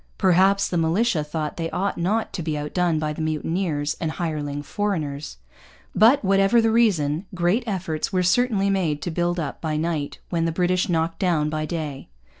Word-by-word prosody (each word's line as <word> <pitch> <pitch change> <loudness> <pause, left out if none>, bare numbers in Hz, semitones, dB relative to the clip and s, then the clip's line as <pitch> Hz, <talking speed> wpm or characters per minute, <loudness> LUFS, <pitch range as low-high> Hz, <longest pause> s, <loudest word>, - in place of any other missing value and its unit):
Perhaps 190 +1 +4
the 175 - -1
militia 170 +2 +1
thought 150 0 -4
they 165 -1 -2
ought 195 +4 -1
not 205 +6 -1
to 175 - -3
be 155 -2 -2
outdone 165 +3 0
by 155 -1 -1
mutineers 155 -1 -1
and 160 -1 -1
hireling 145 -4 -3
foreigners. 155 - -3 0.6
But, 230 +3 +5
whatever 195 +4 +4
the 225 -1 +3
reason, 180 -8 +2
great 180 +7 +1
efforts 180 -6 -2
were 185 -1 +1
certainly 200 0 +2
made 160 -7 0
to 175 - -3
build 175 +1 0
up 145 -4 -4
by 155 -2 -1
night 155 -2 -2
what 170 -2 0
the - - 0
British 180 +4 +1
knocked 165 -1 0
down 160 -5 +1
by 155 0 -2
day. 150 -4 -5
170 Hz, 175 wpm, -23 LUFS, 155-195 Hz, 0.6 s, But